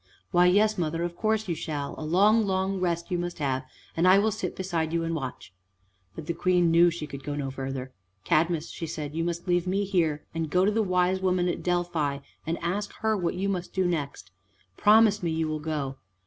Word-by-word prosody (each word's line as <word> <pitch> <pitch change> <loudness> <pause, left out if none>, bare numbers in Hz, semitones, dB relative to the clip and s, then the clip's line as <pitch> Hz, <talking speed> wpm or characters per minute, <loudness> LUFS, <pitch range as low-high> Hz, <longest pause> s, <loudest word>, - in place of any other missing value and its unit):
"Why, 180 -1 +5
yes, 210 +2 +3
mother, 165 0 -1
of 175 0 -3
course 220 +2 0
you 175 - 0
shall, 150 -3 -4
a - - -9
long, 205 +8 +4
long 190 0 0
rest 170 0 -1
you 175 - 0
must 175 0 -4
have, 135 -3 -1 0.3
and 170 +2 +3
I 185 +1 +7
will 215 +2 +3
sit 180 -3 -4
beside 170 -4 -2
you 170 0 +1
and 165 0 -2
watch." 130 - -6 0.6
But 160 - -7
the 170 - -2
Queen 180 -1 +2
knew 170 +1 +6
she 170 -2 -5
could 140 -2 -9
go 145 +1 -3
no 140 -2 -3
further. 130 -1 -5 0.3
"Cadmus," 165 0 +1
she 165 - -5
said, 150 -1 -5
"you 165 +1 -1
must 170 +1 -3
leave 175 0 +1
me 195 +2 +1
here, 165 -6 0
and, 165 -1 -2
go 180 +4 +3
to 205 - +3
the 220 +1 +1
wise 185 -1 +1
woman 180 -1 +1
at 175 - -2
Delphi 175 -5 0 0.3
and 165 +1 -1
ask 200 +4 -2
her 220 0 +2
what 180 -4 -1
you 190 +2 -1
must 185 -3 -3
do 190 -1 +2
next. 145 - -3 0.4
Promise 215 - +5
me 170 - -1
you 160 0 -1
will 155 0 -2
go!" 150 -3 -3
175 Hz, 220 wpm, -27 LUFS, 155-185 Hz, 0.6 s, I